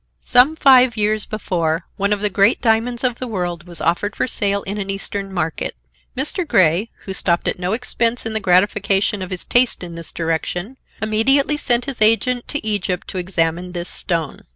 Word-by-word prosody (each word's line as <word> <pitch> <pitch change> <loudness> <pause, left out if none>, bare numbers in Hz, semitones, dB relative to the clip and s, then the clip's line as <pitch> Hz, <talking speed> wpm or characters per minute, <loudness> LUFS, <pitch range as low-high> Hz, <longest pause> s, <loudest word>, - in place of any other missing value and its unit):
Some 255 +6 +4
five 255 -6 +5
years 215 0 +1
before, 170 -6 -2
one 200 +1 -1
of 205 -1 0
the 210 - +1
great 200 +4 +3
diamonds 235 +1 0
of 245 -2 0
the 255 - -4
world 175 -5 -4
was 175 -1 -5
offered 175 +5 0
for - - 0
sale 200 -5 0
in 205 +2 -4
an 195 -1 -4
Eastern 195 0 -3
market. 165 -4 -3 0.4
Mr. 300 +7 0
Grey, 185 - +2 0.2
who 190 - -4
stopped 175 -2 +1
at - - -1
no 180 +2 -1
expense 235 0 0
in 225 - -3
the 220 - 0
gratification 195 +1 +2
of 185 - -5
his 185 -2 -5
taste 245 -5 +2
in 170 -1 -7
this 165 -1 -7
direction, 175 +8 -3 0.2
immediately 270 +7 +2
sent 245 -4 +1
his 270 -5 -5
agent 240 +3 +3
to 290 - -4
Egypt 195 -4 -1
to 185 - -4
examine 175 0 -1
this 175 0 -5
stone. 165 -4 -3
205 Hz, 190 wpm, -19 LUFS, 180-235 Hz, 0.4 s, five